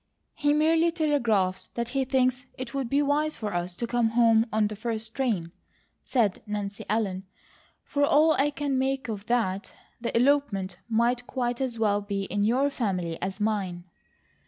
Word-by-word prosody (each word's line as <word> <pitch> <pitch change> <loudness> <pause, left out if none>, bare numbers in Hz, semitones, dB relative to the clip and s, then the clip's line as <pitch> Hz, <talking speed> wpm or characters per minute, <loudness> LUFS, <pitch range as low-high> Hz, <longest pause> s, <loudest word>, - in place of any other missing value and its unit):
"He 290 0 +1
merely 320 +3 +4
telegraphs 235 - +1
that 235 0 -2
he 270 +1 0
thinks 255 0 +1
it 255 -2 -6
would 270 -3 -2
be 280 +3 +2
wise 300 +2 +1
for 210 -3 -4
us 175 0 -3
to 235 - -3
come 235 -1 +1
home 230 0 +4
on 215 0 +2
the 210 +1 -3
first 225 0 -4
train," 215 -11 -1 0.5
said 225 -7 +1
Nancy 205 -1 -4
Ellen. 195 -3 -1 0.6
"For 285 -1 -1
all 300 +3 +5
I 285 0 +2
can 285 -2 -1
make 265 -2 -1
of 210 -1 -5
that, 205 -5 -1 0.3
the 235 - -1
elopement 235 -9 +1
might 240 +2 +1
quite 245 -1 -2
as 250 -3 -2
well 205 -2 +2
be 200 -1 -3
in 205 +1 -1
your 260 +6 +2
family 185 -10 -2
as 190 +1 -3
mine." 200 -5 -1
235 Hz, 170 wpm, -27 LUFS, 205-270 Hz, 0.6 s, all